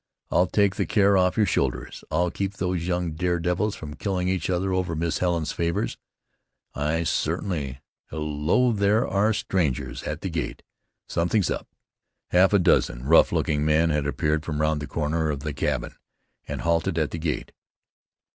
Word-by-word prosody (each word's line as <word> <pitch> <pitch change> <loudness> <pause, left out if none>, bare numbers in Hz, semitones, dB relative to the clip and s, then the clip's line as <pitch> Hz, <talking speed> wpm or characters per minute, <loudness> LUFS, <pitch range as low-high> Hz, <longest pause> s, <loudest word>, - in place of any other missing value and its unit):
I'll 90 +2 +3
take 100 +1 +2
the - - 0
care 100 -2 +4
off 90 +1 +2
your 110 - +4
shoulders; 70 -8 -1
I'll 85 +2 +1
keep 100 0 -3
these 90 -3 -2
young 90 -2 -1
dare 85 +2 0
devils 90 +5 0
from 75 -2 -8
killing 90 +1 -1
each 95 -3 -1
other 95 +1 0
over 90 -3 -1
Miss 80 0 -1
Helen's 85 -4 0
favors. 85 0 -1 0.8
I 75 +3 0
certainly 70 -6 -2 0.3
Hello! 75 +10 +1
There 105 +1 +2
are 100 +3 +2
strangers 90 - -1
at - - -5
the 95 - -3
gate. 80 -2 -4 0.4
Something's 90 +3 +1
up." - - -4 0.6
Half 90 +2 +5
a 100 - +5
dozen - - +2
rough 80 +4 +6
looking 75 -1 0
men 80 +2 +3
had 75 -1 0
appeared 75 +1 0
from 75 -2 -3
round 75 -1 +1
the 75 - -5
corner 80 +1 -1
of 70 -2 -2
the 75 0 -4
cabin, - - -2 0.5
and - - -4
halted 85 +1 +1
at 80 -2 0
the 85 - -4
gate. 80 -1 -3
85 Hz, 170 wpm, -25 LUFS, 75-95 Hz, 0.8 s, rough